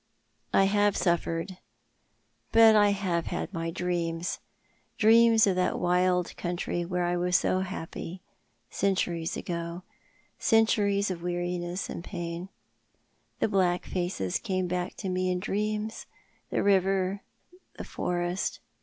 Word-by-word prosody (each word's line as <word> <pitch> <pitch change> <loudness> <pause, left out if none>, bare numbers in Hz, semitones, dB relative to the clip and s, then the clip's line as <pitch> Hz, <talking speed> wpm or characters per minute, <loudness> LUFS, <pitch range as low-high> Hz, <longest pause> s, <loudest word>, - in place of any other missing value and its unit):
I - - +5
have 205 +1 +2
suffered, 170 +1 -1 0.9
but 225 -1 +7
I 205 -1 +6
have 185 -4 -1
had - - -4
my 165 -1 -2
dreams 170 -1 -2 0.3
— - - -40
dreams 225 +1 +6
of 195 -2 +2
that 180 - +1
wild 180 0 +1
country 175 0 -2
where 180 +1 -1
I 175 0 0
was 180 +1 0
so 185 - +2
happy 185 -1 -6 0.2
— 115 +1 -44
centuries 175 -4 0
ago 170 +1 -4 0.3
— - - -38 0.3
centuries 205 -3 +3
of 170 -2 -5
weariness 175 +1 -3
and 170 - -6
pain. 175 0 -5 0.9
The - - +3
black 185 -4 +1
faces 175 - -2
came 185 -1 -1
back 180 +1 -3
to 200 - -5
me 185 0 0
in 180 0 0
dreams— 210 +3 -3 0.4
the - - 0
river— 195 0 +2 0.6
the - - -5
forest. 175 +1 -2
180 Hz, 135 wpm, -28 LUFS, 175-195 Hz, 0.9 s, but